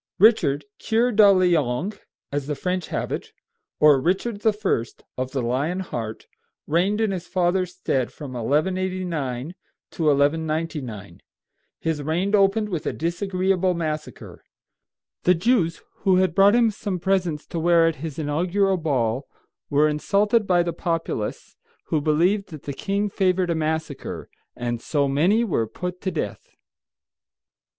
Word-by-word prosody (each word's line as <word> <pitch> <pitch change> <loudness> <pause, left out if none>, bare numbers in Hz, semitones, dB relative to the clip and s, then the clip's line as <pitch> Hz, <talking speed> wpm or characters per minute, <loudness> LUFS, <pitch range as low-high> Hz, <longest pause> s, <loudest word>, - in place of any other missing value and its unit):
] - - -72
Richard 175 -9 +4
Kyur 235 +2 +1
duh 210 -1 +8
le 185 -3 +4
ong, 145 - -1 0.4
as 145 -1 -2
the 150 - -2
French 180 +5 -2
have - - -3
it, - - -4 0.5
or 150 -3 +6
Richard 200 - -1
I. 210 - +1 0.3
of 130 0 -3
the 130 -1 -2
lion 145 +10 -1
heart, 115 -11 -5 0.4
reigned 185 +7 +1
in 220 -2 +1
his 180 -2 -5
father's 180 0 0
stead 130 -9 -1
from 140 -4 -8
1189 160 0 -1 0.4
to 165 - -4
1199. 150 - 0 0.6
His 160 -2 -2
reign 170 +7 -1
opened 210 +1 +3
with 170 -6 -3
a - - -1
disagreeable 185 +2 0
massacre. 155 -2 -5 0.8
The 180 - +4
Jews, 175 -3 +1
who 190 -1 +2
had 185 -2 +2
brought 200 +4 +6
him 235 -2 +4
some 200 -2 -4
presents 180 -5 0
to 170 - -4
wear 170 0 +4
at 165 -1 0
his 155 0 -6
inaugural 180 +6 +1
ball, 135 -5 -1 0.4
were 145 +2 +4
insulted 205 +8 +1
by 175 -1 +4
the 170 -1 -2
populace, 165 -10 -3 0.3
who 155 - +1
believed 175 +7 +2
that 155 -5 -10
the 140 - -4
king 200 +7 -1
favored 185 -3 +1
a - - +2
massacre, 160 -2 -3 0.2
and 120 -1 -3
so 145 +1 0
many 175 +12 +3
were 150 - 0
put 180 +8 -6
to 190 - -1
death. - - -5
170 Hz, 145 wpm, -23 LUFS, 150-190 Hz, 0.8 s, duh